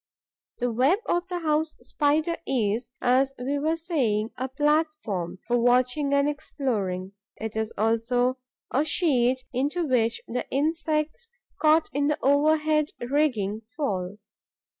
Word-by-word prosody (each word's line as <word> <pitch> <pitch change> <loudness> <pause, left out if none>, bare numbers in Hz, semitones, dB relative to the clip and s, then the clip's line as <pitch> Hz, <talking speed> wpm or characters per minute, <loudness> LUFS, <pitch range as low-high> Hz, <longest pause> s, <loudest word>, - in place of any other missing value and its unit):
The 245 0 -1
web 260 - +3
of 350 +1 0
the 360 -1 -3
House 310 0 0
Spider 310 +3 +1
is, 235 -2 0
as 260 +2 +2
we 275 +3 -2
were 315 +3 +1
saying, 250 - -1
a 260 +1 -3
platform 295 - 0
for 245 0 +1
watching 250 +4 +2
and 280 0 +3
exploring; 210 -11 -2 0.2
it 220 0 -6
is 220 0 -2
also 245 +4 +1 0.3
a 275 - +2
sheet 260 -6 +2
into 290 +7 0
which 235 -4 +1
the 250 +2 -4
insects 310 - -1 0.3
caught 315 +1 +4
in 285 +1 +1
the 300 - +1
overhead 305 +2 +3
rigging 240 -6 0 0.2
fall. 195 -8 -2
270 Hz, 130 wpm, -26 LUFS, 235-305 Hz, 0.3 s, caught